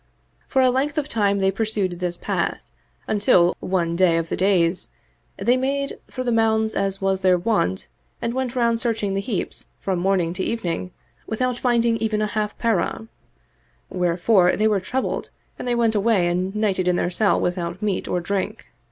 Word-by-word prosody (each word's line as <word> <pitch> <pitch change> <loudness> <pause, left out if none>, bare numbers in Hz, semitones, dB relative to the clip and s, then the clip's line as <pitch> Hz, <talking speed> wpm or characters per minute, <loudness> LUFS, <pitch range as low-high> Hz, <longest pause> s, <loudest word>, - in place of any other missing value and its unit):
For 265 - +2
a 255 - +5
length 280 +4 -1
of 300 -2 0
time 205 -5 +1
they 190 -1 +2
pursued 195 -4 -1
this 175 -1 -2
path - - -3 0.4
until, 185 -4 +3
one 170 -3 -1
day 170 -2 +4
of 165 0 -2
the - - -1
days, 180 -2 +2 0.5
they 245 - +2
made 275 +2 -1
for 255 - -4
the 245 - 0
mounds 220 -1 +2
as 195 0 -1
was 195 -1 +1
their 185 -1 +4
wont 175 - 0 0.3
and 235 - -2
went 260 -1 -2
round 235 -2 +2
searching 220 -4 -1
the 195 - 0
heaps 200 -2 -4
from 190 -2 -1
morning 180 -2 +1
to 185 - -3
evening 180 -5 -2 0.4
without 250 +2 -1
finding 235 -2 +2
even 220 -1 -1
a 215 - +1
half 210 0 -2
parah; 220 0 -1 0.8
wherefore 180 +1 +3
they 215 - +2
were 210 -2 +2
troubled 255 +8 -3 0.3
and - - -5
they 240 - +1
went 230 -2 +2
away 205 -4 +2
and 180 +3 -1
nighted 195 -4 0
in 180 - +3
their 175 - 0
cell 205 +3 +2
without 175 0 -2
meat 205 -3 -1
or 180 - 0
drink. 190 +3 -3
200 Hz, 180 wpm, -22 LUFS, 180-230 Hz, 0.8 s, a